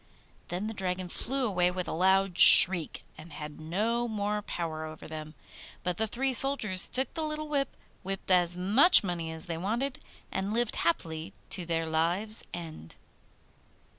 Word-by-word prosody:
Then 180 +4 -5
the 220 - -5
Dragon 185 -2 -4
flew 265 +7 -3
away 180 -5 0
with 180 0 -5
a - - -4
loud 190 +2 +1
shriek, 175 -3 +8 0.2
and 160 +2 -13
had 150 0 -9
no 220 +9 -2
more 210 -1 -3
power 165 -5 -5
over 155 0 -10
them. 155 0 -9 0.5
But 180 -1 -3
the 220 - -1
three 260 +5 -2
soldiers 225 -8 +2
took 260 +1 0
the 325 - -4
little 305 0 -4
whip, 280 -3 -3 0.2
whipped 195 0 -6
as 180 -1 +2
much 215 - +5
money 170 -3 -4
as 160 0 -3
they 165 -2 -5
wanted, 240 +9 -3 0.3
and 195 +3 -3
lived 240 -1 -1
happily 165 -1 -3 0.2
to 180 -3 -1
their 165 -1 -2
lives 175 +7 +2
end. 160 - -9
185 Hz, 165 wpm, -28 LUFS, 165-220 Hz, 0.5 s, shriek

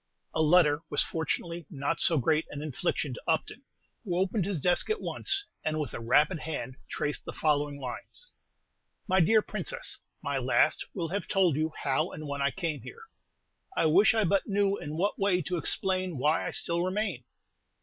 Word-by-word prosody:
A 160 - +1
letter 155 -2 +5
was 145 - +3
fortunately 165 0 -3
not 145 0 -2
so 165 - +2
great 155 +4 +2
an 145 0 -6
infliction 150 -1 -2
to - - -8
Upton, 165 +9 -1 0.4
who 180 -6 -2
opened 190 +1 +1
his 195 -5 -1
desk 175 - +2
at 435 - 0
once, 390 +1 0 0.2
and 155 0 -1
with 145 -7 -3
a - - -4
rapid 150 +9 +3
hand 140 -5 -5
traced 150 0 -2
the - - -6
following 145 -2 0
lines: 130 - -7 0.8
Mv 185 -3 +4
dear 220 -1 +5
Princess, - - -2 0.2
My - - -1
last - - +2
will 170 -4 -2
have 200 +4 -3
told 185 -7 +3
you 155 +2 0
how 145 +5 +1
and 155 - -7
when 140 0 -3
I 140 - +3
came 165 -2 -3
here; 460 +2 -11 0.7
I - - +3
wish 190 +8 +5
I 220 - +3
but 195 +1 +1
knew 200 -1 +2
in 150 -4 -6
what 200 +4 0
way 195 -2 +3
to 180 +3 -2
explain 185 -1 0
why 150 +5 +1
I - - -1
still 170 0 0
remain! 185 - -1
165 Hz, 185 wpm, -29 LUFS, 150-190 Hz, 0.8 s, letter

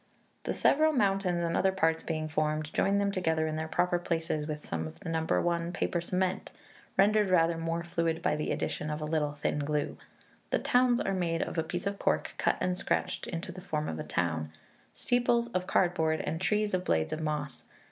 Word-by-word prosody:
The - - 0
several 310 +2 +4
mountains 195 -7 +1
and 170 0 0
other 190 - +3
parts 165 -4 +1
being 155 -1 -2
formed, 155 0 -1
join 200 +1 +2
them 200 0 +1
together 160 -4 +1
in 155 0 -2
their 160 0 -2
proper 175 +2 +1
places 165 -3 -2
with 150 -1 -5
some 80 -1 -3
of 80 - -11
the - - -6
No. 160 -1 0 0.2
i. 170 0 0
paper 175 -1 -1
cement, 185 +2 -1 0.5
rendered 205 +1 +4
rather 170 -2 +4
more 165 +1 -2
fluid 165 -1 -1
by - - +2
the 150 - -2
addition 150 - -2
of 150 0 -2
a 150 - -3
little 150 -2 0
thin 150 0 -1
glue. 145 0 -1 0.5
The - - +2
towns 245 -1 +3
are 195 - 0
made 170 -3 0
of - - -3
a - - +1
piece 175 +3 -4
of 200 0 -2
cork, - - 0
cut - - +2
and 180 0 0
scratched 185 - -1 0.2
to 200 - -5
the 185 +1 -9
form 155 -3 -2
of 80 - -3
the - - -4
town; 80 -3 -1 0.4
steeples 240 -1 +1
of 185 -5 -2
cardboard, 160 -4 +2
and 160 +3 -3
trees 210 +1 +1
of 185 0 +1
blades 80 - +1
of 160 - -3
moss. 150 -4 -3
165 Hz, 210 wpm, -30 LUFS, 155-190 Hz, 0.5 s, several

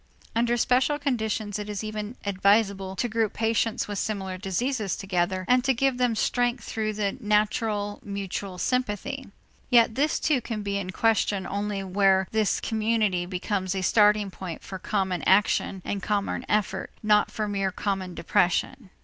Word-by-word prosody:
Under 240 +1 +2
special 255 +5 +2
conditions 220 -7 -2
it 210 0 -5
is 210 0 -4
even 215 +1 -5
advisable 200 -1 +2
to 245 - 0
group 225 -2 0
patients 225 0 0
with 205 -2 -3
similar 195 -3 -3
diseases 200 +3 -1
together 185 -1 -1
and 250 0 +4
to 265 -1 +2
give 265 +1 +1
them 245 -2 +2
strength 245 +1 0
through 215 -1 -2
the 205 -1 -1
natural 210 -1 0
mutual 200 -1 -5
sympathy; 255 +5 -2 0.4
yet 235 -3 +5
this 290 +6 +1
too 290 -5 +2
can 215 -3 -4
be 200 0 -1
in 185 -2 -5
question 205 -1 +1
only 200 0 -2
where 190 0 +3
this 220 -3 +1
community 215 -5 0
becomes 185 +1 -2
a 190 - -2
starting 210 0 +4
point 180 -3 -7
for 190 - -7
common 190 -5 -1
action 190 -1 +3
and 200 - -2
common 205 -1 -1
effort, 205 -2 0
not 210 -1 +4
for 215 -1 -3
mere 195 -2 -1
common 190 -2 -3
depression. 190 +7 0
210 Hz, 160 wpm, -26 LUFS, 195-225 Hz, 0.4 s, yet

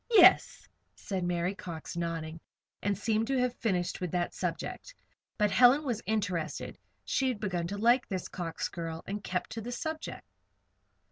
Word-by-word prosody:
"Yes," 450 -4 +6 0.3
said 190 -3 -3
Mary 175 +1 0
Cox, 170 -5 -7
nodding, 165 -1 -3 0.4
and 200 -1 0
seemed 220 +1 +1
to 270 - +1
have 250 -1 +2
finished 185 -5 0
with 180 - -1
that 175 +1 -1
subject. - - -4 0.4
But 210 -1 +3
Helen 250 +6 +6
was 240 -6 -1
interested; 185 -7 -2 0.3
she 265 - +1
had 250 -5 -1
begun 180 -5 -1
to 200 +3 -4
like 240 +4 +4
this 185 -2 -3
Cox 170 -3 -3
girl, 165 -1 -5
and 205 +1 -4
kept 180 -1 -2
to 225 - -4
the 240 +3 -5
subject. 315 +5 -4
200 Hz, 160 wpm, -31 LUFS, 175-235 Hz, 0.4 s, Yes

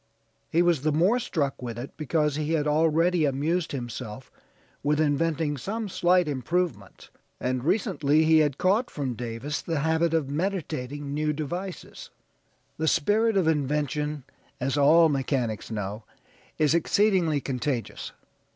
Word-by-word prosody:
He 170 +2 +3
was 170 -5 +2
the 155 +2 +1
more 180 +11 +3
struck 145 - -2
with 120 -2 -5
it 125 +3 -7
because 150 -1 0
he 155 +1 -1
had 150 -2 +1
already 160 +3 +2
amused 155 +5 0
himself 125 -2 -6 0.5
with 150 +1 +1
inventing 155 0 +1
some 215 - -4
slight 180 -1 +3
improvements, 145 - -3 0.3
and 125 0 -2
recently 160 - +2
he 160 0 +5
had 145 -3 +1
caught 210 +7 +2
from 135 -4 -3
Davis 120 +5 -4
the 165 -4 -2
habit 160 +1 +1
of 155 -4 0
meditating 145 -4 -3
new 150 +1 0
devices. 175 +5 -6 0.7
The 160 - -1
spirit 215 +8 +2
of 180 -4 +2
invention, 150 -1 -1 0.4
as 135 +2 -1
all 155 +4 +6
mechanics 135 -6 -1
know, 105 0 -4 0.5
is 155 -1 +3
exceedingly 170 -2 +2
contagious. 125 -2 -3
150 Hz, 135 wpm, -26 LUFS, 135-170 Hz, 0.7 s, all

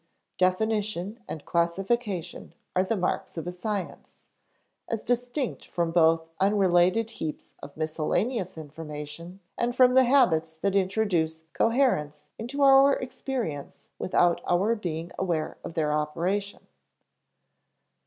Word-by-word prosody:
_ - - -54
definition 205 +2 0
and 155 - -6
classification 180 +2 -1 0.2
are 185 - +4
the 210 +3 -1
marks 180 -1 -2
of 165 - -4
a 175 - -3
science, 195 0 -5 0.6
as 225 -2 -2
distinct 245 +2 -2
from 170 -1 -1
both 165 -1 +3
unrelated 195 +2 +3
heaps 155 -8 -6
of 140 - -11
miscellaneous 175 +6 -1
information 155 +3 -8 0.2
and 240 +1 0
from 250 -1 +6
the 260 0 +6
habits 165 - +3
that 195 +5 -1
introduce 185 -5 +1
coherence 225 - +1
into 270 +6 -2
our 275 0 +7
experience 255 - -5
without 175 -2 +2
our 190 +6 +2
being 170 -6 -4
aware 170 -4 -2
of 165 - -7
their 150 -2 +1
operation. 175 +7 -2
185 Hz, 120 wpm, -27 LUFS, 160-225 Hz, 0.6 s, our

